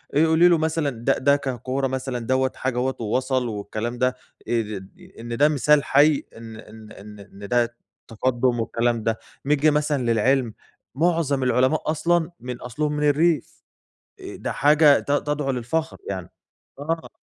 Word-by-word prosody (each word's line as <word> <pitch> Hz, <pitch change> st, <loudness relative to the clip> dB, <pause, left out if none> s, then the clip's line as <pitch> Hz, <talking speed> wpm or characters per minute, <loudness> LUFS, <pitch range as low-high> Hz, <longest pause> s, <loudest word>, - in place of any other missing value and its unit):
إ 155 Hz, +3 st, +5 dB
قولي 160 Hz, +2 st, +5 dB
له 175 Hz, -1 st, +4 dB
مثلًا 160 Hz, -1 st, 0 dB
د 120 Hz, -3 st, -9 dB, 0.2 s
ده 140 Hz, +1 st, +5 dB
ككورة 135 Hz, 0 st, -2 dB
مثلًا 130 Hz, -1 st, -3 dB
دوّة 130 Hz, +2 st, 0 dB
حاجة 130 Hz, -2 st, -3 dB
أهوّة 130 Hz, +2 st, 0 dB
ووصل 130 Hz, +3 st, -1 dB
والكلام 110 Hz, +2 st, -4 dB
ده 125 Hz, +1 st, +1 dB, 0.3 s
إ 110 Hz, -3 st, -1 dB, 0.4 s
إن 115 Hz, 0 st, -5 dB
ده 145 Hz, +3 st, +5 dB
مثال 150 Hz, 0 st, +3 dB
حي 145 Hz, +1 st, +3 dB
إن 115 Hz, -1 st, -10 dB
إن 110 Hz, -1 st, -13 dB
إن 105 Hz, +1 st, -12 dB
إن 100 Hz, 0 st, -11 dB
ده 120 Hz, +1 st, 0 dB, 0.3 s
تقدم 120 Hz, +1 st, 0 dB
والكلام 115 Hz, 0 st, -1 dB
ده، 110 Hz, 0 st, -1 dB, 0.3 s
نيجي 150 Hz, +2 st, +3 dB
مثلًا 150 Hz, -2 st, 0 dB
للعلم، 120 Hz, +1 st, +1 dB, 0.4 s
معظم 155 Hz, -3 st, +1 dB
العلماء 130 Hz, +5 st, +1 dB
أصلًا 170 Hz, +2 st, 0 dB
من 125 Hz, 0 st, -6 dB
أصلهم 150 Hz, +5 st, -3 dB
من 150 Hz, -, -2 dB
الريف، 160 Hz, +2 st, 0 dB, 0.6 s
آآ، -, -, -8 dB
ده -, -, -4 dB
حاجة 150 Hz, 0 st, +5 dB
ت -, -, -4 dB
تدعو 145 Hz, -1 st, 0 dB
للفخر 135 Hz, +6 st, -3 dB
يعني، 95 Hz, -3 st, -5 dB, 0.5 s
آه. 160 Hz, +3 st, -3 dB
130 Hz, 155 wpm, -23 LUFS, 120-150 Hz, 0.6 s, إ